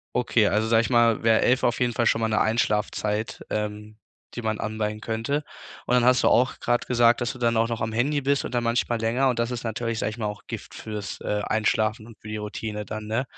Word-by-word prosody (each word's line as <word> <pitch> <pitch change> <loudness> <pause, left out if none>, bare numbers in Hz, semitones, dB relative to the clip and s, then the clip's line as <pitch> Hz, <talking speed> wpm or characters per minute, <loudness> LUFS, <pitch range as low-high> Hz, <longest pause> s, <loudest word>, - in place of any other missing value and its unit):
Okay, 115 -3 +3
also 110 +2 +1
sage 115 0 +4
ich 115 - -3
mal, 120 -2 +3
wär 115 -1 +4
11:00 125 +2 +3
auf 120 - +1
jeden 120 -1 +1
Fall 120 - 0
schon 115 - +3
mal 115 - +1
'ne 110 -1 +1
Einschlafzeit, 105 -1 0
ähm, 105 0 -4 0.4
die 120 - -5
man 110 -1 -1
anpeilen 110 0 -3
könnte. 115 +7 -2 0.4
Und 125 - +1
dann 125 -1 +4
hast 125 0 +4
du - - +6
auch 125 +2 +2
grad 120 0 0
gesagt, 120 -1 +4
dass 120 -1 -1
du 130 - -12
dann 115 -1 +1
auch 115 +1 +2
noch 115 -1 -3
am 110 0 -2
Handy 140 +6 +1
bist 140 +1 +1
und - - -5
dann 120 -1 0
manchmal 115 0 0
länger 120 +4 +2
und 125 -2 0
das 115 +1 0
ist 125 - -4
natürlich- 115 0 -3
sage 105 - -1
ich 110 - -9
mal- 110 - -2
auch 105 0 -5
Gift - - -7
fürs, 105 -3 -6
äh, 105 0 -2
Einschlafen 110 +1 0
und 115 - -14
für - - -15
die 110 0 -4
Routine 105 0 -5
dann, 110 0 -6
ne? 110 +4 -1
115 Hz, 250 wpm, -25 LUFS, 110-120 Hz, 0.4 s, du